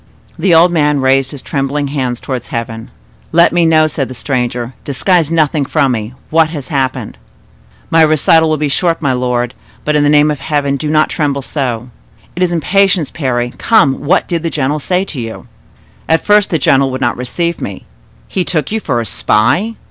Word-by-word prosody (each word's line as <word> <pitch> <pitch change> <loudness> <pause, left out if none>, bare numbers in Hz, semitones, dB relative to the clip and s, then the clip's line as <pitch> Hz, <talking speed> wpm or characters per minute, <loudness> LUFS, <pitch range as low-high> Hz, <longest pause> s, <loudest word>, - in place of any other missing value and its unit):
The 185 -4 +3
old 170 +2 +5
man 150 -3 +2
raised 135 0 +2
his 140 -2 -8
trembling 140 +1 -2
hands 130 -4 -2
towards 130 -3 -5
heaven. 115 -1 -5 0.4
"Let 170 +1 +4
me 170 -1 +3
know," 155 -1 +4
said 145 -3 -2
the 130 - -9
stranger,—"disguise 130 +7 -1
nothing 155 -2 +1
from 140 -1 +1
me—what 125 +8 -1
has 150 -5 -7
happened?" 130 - -2 0.7
"My 165 - +5
recital 160 +1 +4
will 155 - +1
be 150 0 -1
short, 165 +4 0
my 140 -4 0
lord; 125 -1 -1 0.3
but 150 - +1
in 150 - +3
the 145 - +3
name 150 0 +4
of 150 - -4
Heaven 145 -1 -1
do 150 +2 -3
not 155 0 +2
tremble 140 -3 -1
so." 125 -4 -3 0.5
"It 180 - -5
is 180 -1 +2
impatience, 180 +1 +1
Parry. 120 -5 -2
Come, 155 -13 +3
what 145 - +2
did 170 -2 -2
the 165 - -2
general 145 0 -1
say 180 +5 0
to 145 -9 -6
you?" 115 -1 -7 0.6
"At 160 0 +2
first 210 -1 +4
the 165 - +1
general 135 -1 +2
would 130 0 -4
not - - +1
receive 170 +7 -3
me." 100 - -6 0.4
"He 185 - -1
took 160 -3 -2
you 220 - 0
for 120 - -1
a - - -5
spy?" 130 - +1
145 Hz, 190 wpm, -14 LUFS, 130-165 Hz, 0.7 s, old